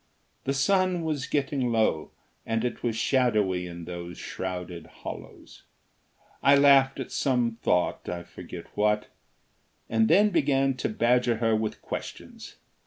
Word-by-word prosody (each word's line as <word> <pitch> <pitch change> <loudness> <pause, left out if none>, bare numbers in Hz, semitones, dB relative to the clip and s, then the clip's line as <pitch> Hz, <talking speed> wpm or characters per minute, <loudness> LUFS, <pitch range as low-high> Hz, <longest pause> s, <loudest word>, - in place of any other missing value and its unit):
The 135 - 0
sun 185 +4 +2
was 150 -4 -2
getting 135 -3 0
low 110 -9 +1 0.3
and 115 +1 -1
it 125 - -3
was 120 -2 -1
shadowy 105 -8 +1
in 85 -1 -8
those 85 0 -7
shrouded 90 -3 -6
hollows. - - -10 0.8
I 140 - +6
laughed 140 -1 +5
at 130 - -5
some 120 -4 0
thought, 90 - 0
I 85 -1 -4
forget 85 - -10
what, 105 0 +1 0.8
and 110 0 +2
then 205 +5 +5
began 135 -5 +2
to - - -1
badger 120 +2 +2
her 115 0 +1
with 110 0 -3
questions. - - -7
120 Hz, 135 wpm, -27 LUFS, 105-135 Hz, 0.8 s, I